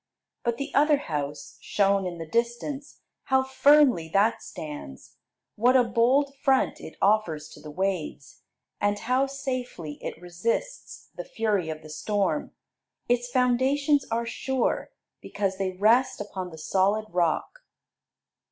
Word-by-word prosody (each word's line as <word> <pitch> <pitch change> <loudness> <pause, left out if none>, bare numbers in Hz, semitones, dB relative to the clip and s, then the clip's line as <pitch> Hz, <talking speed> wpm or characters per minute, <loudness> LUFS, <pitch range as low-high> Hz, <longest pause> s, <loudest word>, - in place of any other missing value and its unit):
But 235 -1 0
the 275 - -5
other 295 +1 +4
house, 150 - -5
shown 195 -2 +1
in 175 -1 -5
the 165 - -6
distance: 240 - -3 0.2
how 265 0 +3
firmly 265 - +4
that 205 +5 +2
stands! 145 - -9 0.4
What 250 +4 +4
a 250 - +5
bold 250 +5 +2
front 265 -1 +2
it 160 - -10
offers 185 -8 +1
to - - -13
the 155 - -9
waves, 180 -4 -3 0.4
and 205 0 +1
how 255 +5 +1
safely 255 - -5
it - - -5
resists 185 - -4
the - - -5
fury 210 - -1
of 155 -1 -6
the 155 - -11
storm. 205 - -1 0.6
Its 245 0 +1
foundations 265 +3 +2
are 230 +1 -1
sure, 260 +2 -1 0.3
because 195 -2 -3
they 190 -1 -1
rest 240 +7 +3
upon 190 -3 -5
the 160 - -11
solid 195 +6 +1
rock. 175 - 0
220 Hz, 135 wpm, -26 LUFS, 180-260 Hz, 0.6 s, a